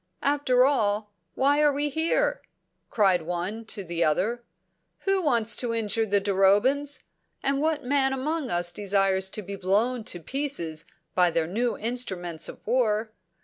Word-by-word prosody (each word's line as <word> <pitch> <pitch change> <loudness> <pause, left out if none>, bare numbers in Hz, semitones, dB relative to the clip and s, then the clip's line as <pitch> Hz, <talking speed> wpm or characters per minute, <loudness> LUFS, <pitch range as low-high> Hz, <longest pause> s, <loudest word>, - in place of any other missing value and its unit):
"After 275 -3 +3
all, 210 -6 0 0.2
why 285 +2 +3
are 295 -1 +5
we 290 +1 0
here?" 325 - 0 0.5
cried 190 -5 +3
one 180 +7 -4
to 210 -2 -3
the 170 -1 -1
other. 215 +10 0 0.6
"Who 390 -1 +1
wants 235 -8 +3
to 235 -2 -1
injure 225 0 0
the 200 0 +2
Durobans? 205 +9 +2 0.4
And 275 0 +1
what 310 -1 0
man 270 +1 +2
among 280 +2 -2
us 175 -2 +1
desires 195 0 +1
to 215 - -6
be 200 +2 -6
blown 215 +6 0
to 175 - -3
pieces 170 - -3 0.3
by 180 -1 +4
their 165 -1 0
new 230 +7 -1
instruments 190 -9 -2
of - - -12
war? 220 -2 +1
225 Hz, 150 wpm, -26 LUFS, 190-275 Hz, 0.6 s, are